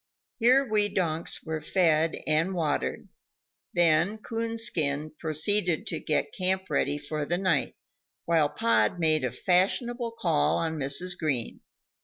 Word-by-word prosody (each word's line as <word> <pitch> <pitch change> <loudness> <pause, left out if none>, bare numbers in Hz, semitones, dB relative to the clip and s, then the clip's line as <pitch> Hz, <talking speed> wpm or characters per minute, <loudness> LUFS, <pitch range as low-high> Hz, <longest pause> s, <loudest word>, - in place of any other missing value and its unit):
Here 255 +4 +4
we 210 -3 +1
donks 170 -4 -1
were 160 -1 -3
fed 165 -3 +2
and 160 +5 +1
watered; 155 -4 -2 0.6
then 175 +4 +2
Coonskin 220 -11 -1
proceeded 175 +4 0
to - - -3
get - - -1
camp 185 -2 -1
ready 145 0 0
for 150 +1 -4
the 175 +4 -1
night, 185 0 0 0.5
while 160 -3 +2
Pod 115 -3 +1
made 155 -3 +2
a 125 - -1
fashionable 230 - 0
call 75 0 +1
on 160 -1 -2
Mrs. 145 +7 0
Green. 145 -9 -2
165 Hz, 130 wpm, -27 LUFS, 155-195 Hz, 0.6 s, Here